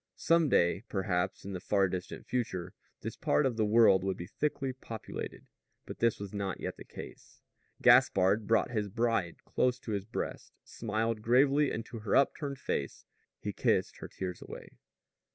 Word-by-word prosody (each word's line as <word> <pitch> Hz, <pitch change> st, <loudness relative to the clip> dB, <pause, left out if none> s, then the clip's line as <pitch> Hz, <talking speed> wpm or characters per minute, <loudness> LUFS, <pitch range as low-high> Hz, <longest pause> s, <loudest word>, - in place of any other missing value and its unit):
Some 165 Hz, -2 st, +3 dB
day, 85 Hz, +6 st, +3 dB
perhaps, 95 Hz, -2 st, -1 dB
in 100 Hz, -, -5 dB
the 90 Hz, -, -4 dB
far 95 Hz, +1 st, +2 dB
distant 90 Hz, 0 st, -5 dB
future, 105 Hz, -8 st, -3 dB, 0.3 s
this -, -, -5 dB
part 75 Hz, -, +2 dB
of 125 Hz, -, +1 dB
the 110 Hz, -1 st, +1 dB
world 105 Hz, -4 st, +6 dB
would 95 Hz, -1 st, -1 dB
be 85 Hz, -, -6 dB
thickly 135 Hz, +4 st, -2 dB
populated. 115 Hz, -4 st, -7 dB, 0.4 s
But -, -, -8 dB
this 115 Hz, -1 st, +2 dB
was 100 Hz, -1 st, -7 dB
not 100 Hz, -2 st, -3 dB
yet -, -, -5 dB
the -, -, -9 dB
case. -, -, -11 dB, 0.4 s
Gaspard 100 Hz, +3 st, +5 dB
brought 115 Hz, +1 st, +2 dB
his 105 Hz, -3 st, -1 dB
bride 115 Hz, -5 st, -1 dB
close 125 Hz, -1 st, +1 dB
to 110 Hz, -, -6 dB
his 100 Hz, -2 st, -2 dB
breast, 115 Hz, -, -5 dB
smiled 110 Hz, 0 st, -2 dB
gravely 135 Hz, +5 st, +4 dB
into 115 Hz, +1 st, -5 dB
her 105 Hz, -2 st, 0 dB
upturned 140 Hz, 0 st, +1 dB
face. 70 Hz, -, -3 dB, 0.3 s
He -, -, -4 dB
kissed -, -, +1 dB
her -, -, -7 dB
tears 90 Hz, -2 st, -6 dB
away. -, -, -9 dB
110 Hz, 170 wpm, -31 LUFS, 95-120 Hz, 0.4 s, world